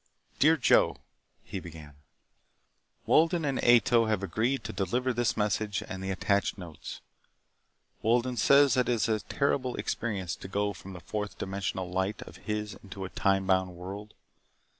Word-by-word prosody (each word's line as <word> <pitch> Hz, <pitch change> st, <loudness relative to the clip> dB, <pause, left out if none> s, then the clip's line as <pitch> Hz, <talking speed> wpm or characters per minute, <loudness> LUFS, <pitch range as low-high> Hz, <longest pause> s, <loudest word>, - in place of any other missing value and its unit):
Dear 160 Hz, +3 st, +5 dB
Joe: 135 Hz, -, +4 dB, 0.5 s
(he 95 Hz, -, -5 dB
began) 80 Hz, -4 st, -11 dB, 1.1 s
Wolden 165 Hz, 0 st, +3 dB
and 135 Hz, -2 st, -1 dB
Ato 120 Hz, -1 st, +5 dB
have 105 Hz, -3 st, 0 dB
agreed 115 Hz, +9 st, 0 dB
to -, -, -5 dB
deliver 120 Hz, +7 st, 0 dB
this 120 Hz, 0 st, 0 dB
message 105 Hz, -1 st, 0 dB
and 95 Hz, 0 st, -6 dB
the 95 Hz, -, -3 dB
attached 100 Hz, +2 st, 0 dB
notes. 85 Hz, -6 st, -9 dB, 1.0 s
Wolden 120 Hz, +3 st, +2 dB
says 140 Hz, +4 st, +5 dB
that 125 Hz, 0 st, +2 dB
it -, -, +4 dB
is 115 Hz, 0 st, +1 dB
a 110 Hz, -1 st, +1 dB
terrible 130 Hz, +3 st, -1 dB
experience 95 Hz, -7 st, -3 dB
to -, -, -9 dB
go 100 Hz, +1 st, -1 dB
from 95 Hz, +1 st, -10 dB
the 90 Hz, -, -9 dB
fourth 105 Hz, +1 st, -4 dB
dimensional 95 Hz, -1 st, -3 dB
light 95 Hz, +3 st, -2 dB
of -, -, -13 dB
his 105 Hz, -1 st, -2 dB
into 95 Hz, -1 st, -7 dB
a -, -, -6 dB
time 95 Hz, 0 st, +1 dB
bound 95 Hz, -1 st, +1 dB
world. 100 Hz, +4 st, -8 dB
105 Hz, 160 wpm, -29 LUFS, 95-120 Hz, 1.1 s, Dear